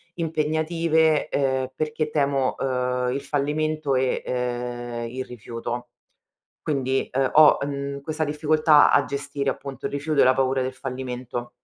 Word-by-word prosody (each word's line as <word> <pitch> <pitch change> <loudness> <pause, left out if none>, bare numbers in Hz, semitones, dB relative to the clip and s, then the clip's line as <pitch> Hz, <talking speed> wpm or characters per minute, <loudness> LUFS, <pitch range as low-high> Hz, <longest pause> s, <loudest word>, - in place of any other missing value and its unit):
impegnative, 160 -1 +1
ehm, 130 -3 0
perché 155 0 -2
temo, 140 -3 +1
uhm, 125 -1 -1
il 135 +2 -2
fallimento 150 0 -1
e, 130 0 0
ehm, 120 -1 -3
il 130 +2 -5
rifiuto. 120 +1 -6 0.8
Quindi, 135 -2 -1
uhm, 135 0 +2
ho, 155 -1 +7
mhmm, 140 0 -3
questa 155 +2 -2
difficoltà 150 0 +4
a 140 - +5
gestire 140 0 -3
appunto 135 -1 -6
il - - -10
rifiuto 145 +1 0
e - - +7
la 130 - +5
paura 130 0 +1
del 130 0 -2
fallimento. 125 -2 -5
140 Hz, 140 wpm, -24 LUFS, 125-150 Hz, 0.8 s, ho